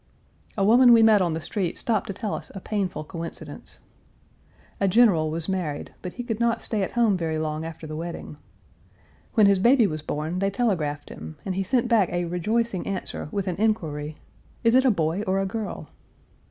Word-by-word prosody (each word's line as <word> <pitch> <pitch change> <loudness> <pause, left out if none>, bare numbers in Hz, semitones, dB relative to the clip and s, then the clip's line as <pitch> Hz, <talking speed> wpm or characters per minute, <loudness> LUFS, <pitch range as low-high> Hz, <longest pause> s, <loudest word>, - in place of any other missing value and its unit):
Page - - -35
363 195 - 0
A - - +3
woman 240 +2 +7
we 225 -1 +7
met 215 -2 +6
on 175 -3 +1
the 160 - -2
street 175 +3 -3
stopped 220 -3 -1
to - - -3
tell 205 +2 -4
us - - -6
a - - -4
painful 190 -5 -2
coincidence. 165 +1 -7 1.0
A 195 - +2
general 185 -7 +4
was 160 +1 -2
married 175 -7 -3
but 180 - -6
he 245 - -5
could 225 -3 -3
not 235 -1 +2
stay 215 -3 -2
at 190 - -2
home 230 -4 +3
very 165 -3 -2
long 155 0 -2
after 165 0 -7
the 155 0 -6
wedding. 165 -2 -6 1.0
When 215 -3 +6
his 200 -1 +4
baby 240 +3 +5
was 155 -5 -2
born 155 +4 -3
they 195 +1 +1
telegraphed 165 - -1
him, 80 +1 -9
and 190 - -2
he 190 - -1
sent 245 +4 +1
back 220 -6 +3
a 175 0 -1
rejoicing 195 +4 -1
answer 190 -5 -4
with 200 -1 -2
an 180 - -2
inquiry, 155 -9 -1 0.5
"Is 230 0 +4
it 260 +1 +5
a - - +6
boy 165 -2 0
or 190 +1 +1
a 195 - 0
girl?" 215 +2 -5
190 Hz, 205 wpm, -25 LUFS, 165-220 Hz, 1.0 s, woman